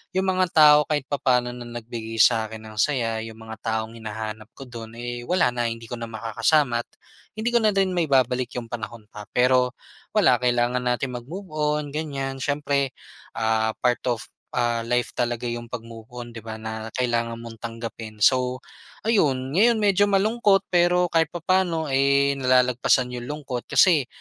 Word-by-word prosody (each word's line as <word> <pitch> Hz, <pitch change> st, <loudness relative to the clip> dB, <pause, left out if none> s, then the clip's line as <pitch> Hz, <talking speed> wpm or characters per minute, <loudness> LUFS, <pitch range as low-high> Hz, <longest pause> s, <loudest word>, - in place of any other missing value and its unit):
yung 190 Hz, -, +2 dB
mga 185 Hz, 0 st, +2 dB
tao 150 Hz, -1 st, +8 dB
kahit 150 Hz, -2 st, 0 dB
papaano 125 Hz, -4 st, +1 dB
na 120 Hz, 0 st, -8 dB
nagbigay 115 Hz, -1 st, -7 dB
sa 110 Hz, +1 st, +5 dB
akin 110 Hz, 0 st, -9 dB
ng 110 Hz, 0 st, -12 dB
saya, 115 Hz, -4 st, +1 dB
yung 110 Hz, 0 st, -9 dB
mga 110 Hz, -, -6 dB
taong 110 Hz, 0 st, -2 dB
hinahanap 110 Hz, -1 st, -6 dB
ko -, -, -9 dB
dun 115 Hz, -2 st, -9 dB
eh, 120 Hz, 0 st, -5 dB
wala 180 Hz, -8 st, +3 dB
na 120 Hz, -1 st, -1 dB
hindi 115 Hz, 0 st, -7 dB
ko 120 Hz, -, -5 dB
na 115 Hz, -, -5 dB
makakasama't 120 Hz, +3 st, +1 dB, 0.5 s
hindi 220 Hz, +2 st, -1 dB
ko 240 Hz, -, +4 dB
na 215 Hz, -, +4 dB
rin 195 Hz, -1 st, +2 dB
maibabalik 130 Hz, -6 st, +2 dB
yung 120 Hz, -, -4 dB
panahon 115 Hz, -1 st, -7 dB
pa. 105 Hz, -1 st, -10 dB
Pero 125 Hz, 0 st, +3 dB, 0.4 s
wala, -, -, +3 dB
kailangan 125 Hz, 0 st, +1 dB
nating 125 Hz, +1 st, -1 dB
magmove 165 Hz, +12 st, -7 dB
-on 150 Hz, 0 st, 0 dB
ganyan 135 Hz, -3 st, -3 dB
siyempre 140 Hz, -1 st, 0 dB, 0.4 s
ah, 110 Hz, 0 st, +1 dB
part 125 Hz, -1 st, +3 dB
of, 120 Hz, -2 st, -1 dB, 0.3 s
ah, 120 Hz, -1 st, +1 dB
life 125 Hz, 0 st, 0 dB
talaga 120 Hz, -1 st, -2 dB
yung 120 Hz, 0 st, -5 dB
pagmove-on 115 Hz, 0 st, -8 dB
'di 115 Hz, -, -7 dB
ba, 110 Hz, 0 st, -7 dB
na 110 Hz, 0 st, -6 dB
kailangan 120 Hz, -2 st, 0 dB
mong 115 Hz, -1 st, -10 dB
tanggapin. 115 Hz, -1 st, -7 dB
So 130 Hz, -1 st, +2 dB, 0.5 s
ayun 135 Hz, -, +2 dB
ngayon 235 Hz, +2 st, +5 dB
medyo 205 Hz, -1 st, +3 dB
malungkot 205 Hz, 0 st, +3 dB
pero 180 Hz, 0 st, +4 dB
kahit 165 Hz, -1 st, +3 dB
papaano 175 Hz, -1 st, +1 dB
eh, 140 Hz, +1 st, +3 dB
nalalagpasan 125 Hz, 0 st, +3 dB
yung 120 Hz, 0 st, -6 dB
lungkot, 140 Hz, -5 st, -5 dB
kasi 160 Hz, -9 st, +4 dB
125 Hz, 165 wpm, -24 LUFS, 115-150 Hz, 0.5 s, tao